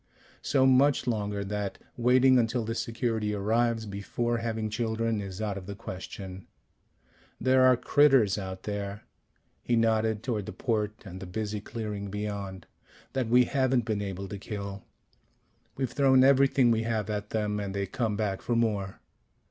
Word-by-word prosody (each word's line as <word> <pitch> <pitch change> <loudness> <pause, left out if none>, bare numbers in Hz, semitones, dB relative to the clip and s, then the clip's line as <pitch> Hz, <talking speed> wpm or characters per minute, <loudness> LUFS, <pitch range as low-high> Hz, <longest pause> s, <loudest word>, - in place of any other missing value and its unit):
So 135 -2 +2
much 135 +1 +4
longer 105 -4 -2
that 105 0 -3 0.2
waiting 125 +1 +5
until 115 0 0
the 115 - -2
security 115 -2 -1
arrives 115 +2 +1
before 115 +4 -2
having 110 -1 -2
children 110 0 -1
is 95 -1 -7
out 100 -2 -2
of 95 - -13
the 100 - -5
question. 95 -2 -8 0.9
There 130 +1 +4
are 130 -1 +6
critters 135 -5 +4
out 95 -2 -6
there 100 0 -4 0.3
" - - -43
he 120 - +1
nodded 110 -1 +1
toward 110 -6 -2
the - - -5
port 110 -2 -2
and 95 -1 -8
the 95 - -7
busy 105 +2 -3
clearing 105 -2 -5
beyond 100 -2 -5 0.5
"that 130 -4 -1
we 125 +1 +6
haven't 130 -3 +1
been 110 -3 -1
able 100 -1 -4
to 100 - -6
kill. 100 -1 -6 0.9
We've 130 -3 -2
thrown 130 -1 +5
everything 135 -2 +5
we 110 -1 +2
have 110 -2 -1
at 105 0 -4
them, 105 -1 -1
and 100 -1 -4
they 100 0 -1
come 110 +2 -2
back 100 -3 -1
for 120 - -1
more. 105 -5 -1
110 Hz, 165 wpm, -28 LUFS, 100-120 Hz, 0.9 s, are